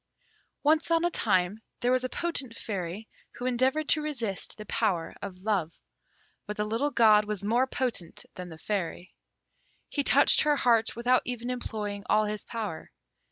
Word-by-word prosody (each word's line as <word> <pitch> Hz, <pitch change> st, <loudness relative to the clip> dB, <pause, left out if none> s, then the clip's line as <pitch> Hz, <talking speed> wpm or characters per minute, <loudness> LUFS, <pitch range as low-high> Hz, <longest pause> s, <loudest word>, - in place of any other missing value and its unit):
Once 310 Hz, +3 st, +3 dB
on 335 Hz, 0 st, +3 dB
a 350 Hz, -, +1 dB
time 200 Hz, -, +1 dB, 0.2 s
there 245 Hz, 0 st, +2 dB
was 255 Hz, 0 st, +2 dB
a 255 Hz, -, -2 dB
potent 280 Hz, -9 st, -3 dB
Fairy, 195 Hz, 0 st, -5 dB, 0.3 s
who 250 Hz, -, -6 dB
endeavoured 260 Hz, +5 st, +1 dB
to 310 Hz, -, +4 dB
resist 240 Hz, -10 st, -2 dB
the 215 Hz, -, -8 dB
power 190 Hz, -6 st, 0 dB
of 185 Hz, -2 st, -8 dB
Love; 190 Hz, -7 st, -1 dB, 0.7 s
but 210 Hz, -, -5 dB
the 210 Hz, -, 0 dB
little 230 Hz, +7 st, 0 dB
god 215 Hz, -5 st, +5 dB
was 210 Hz, -2 st, -3 dB
more 240 Hz, +5 st, +2 dB
potent 240 Hz, -11 st, -3 dB
than 180 Hz, -1 st, -8 dB
the 160 Hz, -, -10 dB
Fairy. 185 Hz, -1 st, -4 dB, 0.8 s
He 285 Hz, -, -1 dB
touched -, -, +6 dB
her 300 Hz, -1 st, +3 dB
heart 230 Hz, -5 st, +2 dB
without 245 Hz, +2 st, +3 dB
even 245 Hz, 0 st, -3 dB
employing 210 Hz, -4 st, -4 dB
all 215 Hz, 0 st, +4 dB
his 210 Hz, -1 st, -3 dB
power. 215 Hz, -8 st, -5 dB
225 Hz, 165 wpm, -28 LUFS, 200-255 Hz, 0.8 s, touched